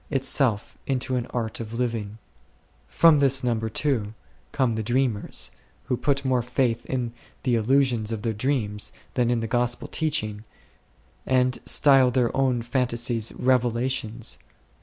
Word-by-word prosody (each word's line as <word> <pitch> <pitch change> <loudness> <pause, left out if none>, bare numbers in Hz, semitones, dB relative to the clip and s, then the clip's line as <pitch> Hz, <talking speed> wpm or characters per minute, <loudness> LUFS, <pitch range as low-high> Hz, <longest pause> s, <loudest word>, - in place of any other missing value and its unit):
V. 140 - +1
£ 120 -3 -1 0.7
From 165 -3 +5
this 135 -1 +3
number, 115 -2 0
too, 110 -4 -1 0.4
come 130 -5 +1
the 110 - -2
Dreamers, 120 -2 0 0.3
who 125 - -1
put 140 +2 -1
more 130 -2 +2
faith 120 -1 -1
in 125 -3 -2 0.3
the 125 - +1
illusions 120 -1 +2
of 110 -2 -4
their 115 -2 0
dreams 105 -3 -2
9 - - -26
than 120 -2 +1
in 120 -1 +1
the 115 - -2
Gospel 120 +1 -1
teaching, 110 -10 -1 0.8
and 130 -1 +2
style 135 -3 +5
their 125 -1 +1
own 130 -3 +1
phantasies 120 -2 -1
"revelations." 120 -2 0
120 Hz, 125 wpm, -25 LUFS, 115-130 Hz, 0.8 s, From